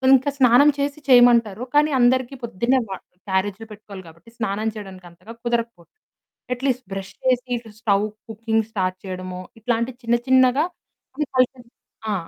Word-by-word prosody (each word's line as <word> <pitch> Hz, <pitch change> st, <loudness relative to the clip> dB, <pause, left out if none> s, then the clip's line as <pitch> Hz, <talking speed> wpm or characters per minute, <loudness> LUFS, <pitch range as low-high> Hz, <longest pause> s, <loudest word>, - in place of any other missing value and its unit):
ఇంకా 265 Hz, +2 st, +1 dB
స్నానం 255 Hz, +2 st, +6 dB
చేసి 280 Hz, +1 st, -2 dB
చేయమంటారు. 240 Hz, -3 st, +5 dB
కానీ 300 Hz, +1 st, +4 dB
అందరికీ 255 Hz, +2 st, +2 dB
పొద్దున్నే 235 Hz, +4 st, +1 dB
వ -, -, -8 dB, 0.4 s
క్యారేజులు 190 Hz, +3 st, -1 dB
పెట్టుకోవాలి 205 Hz, -2 st, -10 dB
కాబట్టి 170 Hz, +6 st, -16 dB
స్నానం 215 Hz, -1 st, -2 dB
చేయడానికి 190 Hz, -3 st, -9 dB
అంతగా 210 Hz, +7 st, -13 dB
కుదరకపోవచ్ఛు. 230 Hz, -, -3 dB, 0.6 s
అట్లీస్ట్ 255 Hz, 0 st, -2 dB
బ్రష్ 195 Hz, 0 st, -6 dB
చేసి 255 Hz, -1 st, +2 dB
ఇట్లా 230 Hz, -2 st, -11 dB
స్టవ్ 205 Hz, -3 st, +2 dB, 0.3 s
కుకింగ్ 220 Hz, 0 st, -1 dB
స్టార్ట్ 185 Hz, -3 st, -1 dB
చేయడమో 185 Hz, -1 st, -6 dB, 0.2 s
ఇట్లాంటి 235 Hz, +2 st, -1 dB
చిన్న 235 Hz, 0 st, +1 dB
చిన్నగా 260 Hz, +2 st, +4 dB, 0.5 s
కొన్ని 300 Hz, +2 st, -2 dB
కల్చర్స్ 250 Hz, -2 st, 0 dB, 0.4 s
ఆ! -, -, +1 dB
230 Hz, 140 wpm, -22 LUFS, 200-255 Hz, 0.6 s, స్నానం